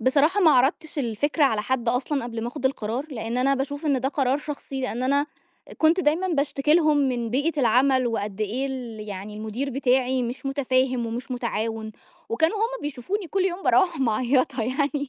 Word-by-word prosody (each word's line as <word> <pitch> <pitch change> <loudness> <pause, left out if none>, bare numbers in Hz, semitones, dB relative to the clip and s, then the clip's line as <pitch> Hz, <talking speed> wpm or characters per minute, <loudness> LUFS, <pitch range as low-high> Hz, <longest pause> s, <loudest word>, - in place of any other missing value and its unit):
بصراحة، 295 - +3
ما 325 - +6
عرضتِش 290 +4 +2
الفكرة 285 +5 +1
على 220 -6 +2
حد 255 -1 -1
أصلًا 260 +2 0
قبل 230 -2 -5
ما 235 - -2
آخُد 265 0 -2
القرار، 250 +2 -2
لإن 230 -1 -3
أنا 275 +2 +3
باشوف 285 +3 -3
إن 275 -3 +2
ده 265 - 0
قرار 275 -1 +1
شخصي. 285 -2 -6
لإن 250 -1 -3
أنا 280 +3 +2 0.5
كنت 325 +3 +4
دايمًا 345 +4 +1
باشتكِي 295 -1 +1
لهُم 310 -3 +4
من 245 -5 0
بيئة 290 +4 0
العمَل، 255 +2 +3
وقد 210 -3 -3
إيه 240 +6 -1
ال 245 -5 -6
يعني 200 +2 -6
المدير 220 +6 -3
بتاعي 260 -1 +1
مش 245 +4 -5
متفاهم 260 -3 +1
ومش 240 +3 -5
متعاون، 225 -3 -3 0.4
وكانوا 320 - +1
هُم 460 +1 -2
بيشوفوني 295 - -3
كل 385 +3 0
يوم 380 0 -2
بارَوِّح 365 -7 +3
معيَّطة 255 +1 +1
يعني، 280 +3 -1
265 Hz, 180 wpm, -24 LUFS, 240-290 Hz, 0.5 s, ما